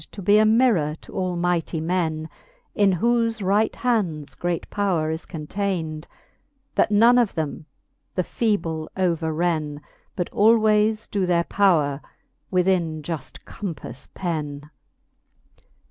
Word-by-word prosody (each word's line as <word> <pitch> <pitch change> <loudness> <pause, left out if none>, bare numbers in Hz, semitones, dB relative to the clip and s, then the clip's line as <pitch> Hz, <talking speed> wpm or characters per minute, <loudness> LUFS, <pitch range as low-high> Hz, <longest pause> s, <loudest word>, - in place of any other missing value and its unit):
To 205 - -7
be 205 +3 +5
a 215 - +5
mirrour 215 -10 +3
to - - -13
ail 185 -1 -1
mighty 170 -1 0
men, 160 -2 -1 0.5
In 205 -2 +3
whofe 230 +1 +1
right 205 +3 +2
hands 185 -12 -1
great 175 -1 -3
power 180 -6 0
is 160 +1 -5
contayned, 160 -1 -3 0.7
That - - +2
none 230 +4 +6
of 235 -5 +1
them 155 0 -4 0.5
the 180 - +1
fe<?ble 165 -8 -1
overren, 160 -3 0 0.4
But 175 - -3
alwaies 215 0 +3
doe 195 -3 -1
their 170 -1 +2
po 190 -2 +3
wre 145 -1 -2 0.5
within 175 -4 +1
juft 160 -3 -6
compaiTc 150 - -7
pen. 150 -4 -4
175 Hz, 125 wpm, -23 LUFS, 160-205 Hz, 0.7 s, none